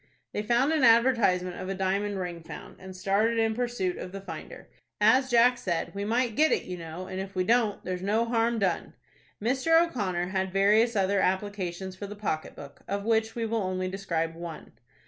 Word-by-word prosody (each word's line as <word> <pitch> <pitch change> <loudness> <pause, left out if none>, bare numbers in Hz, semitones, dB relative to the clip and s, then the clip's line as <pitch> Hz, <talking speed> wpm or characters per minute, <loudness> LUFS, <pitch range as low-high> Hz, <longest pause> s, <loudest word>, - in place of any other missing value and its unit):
They - - -1
found 240 +7 +2
an 310 -4 +1
advertisement 230 -7 +4
of 185 - -5
a 195 - -2
diamond 195 +2 -1
ring 175 -2 -5
found, 160 - -10
and 190 0 -10
started 200 +5 +1
in 225 -1 +2
pursuit 235 -6 -2
of 180 - -6
the 195 - -6
finder. 175 -5 -9 0.3
As 255 +5 +4
Jack? 245 0 +4
said, 170 -3 -2
"We 200 0 -3
might 235 +1 0
get 310 +4 +4
it, - - +1
you 180 - -6
know; 165 +1 -7
and 185 0 -5
if 195 0 -6
we 185 - +1
don't, 225 0 +1
there's 180 -1 -3
no 215 +4 +1
harm 230 0 +1
done." 190 -5 -1 0.5
Mr. 265 +9 +3
O'Connor 195 - -1
had 190 -1 -1
various 210 +5 +3
other 200 0 +2
applications 190 -1 -2
for 200 +2 -7
the 205 - -8
pocket 195 -7 -3
book, 140 -1 -11
of 200 +1 -3
which 225 0 +1
we 230 -1 -1
will 225 0 -1
only 185 -1 -2
describe 170 -4 -2
one. 170 -1 -8
200 Hz, 200 wpm, -28 LUFS, 185-230 Hz, 0.5 s, advertisement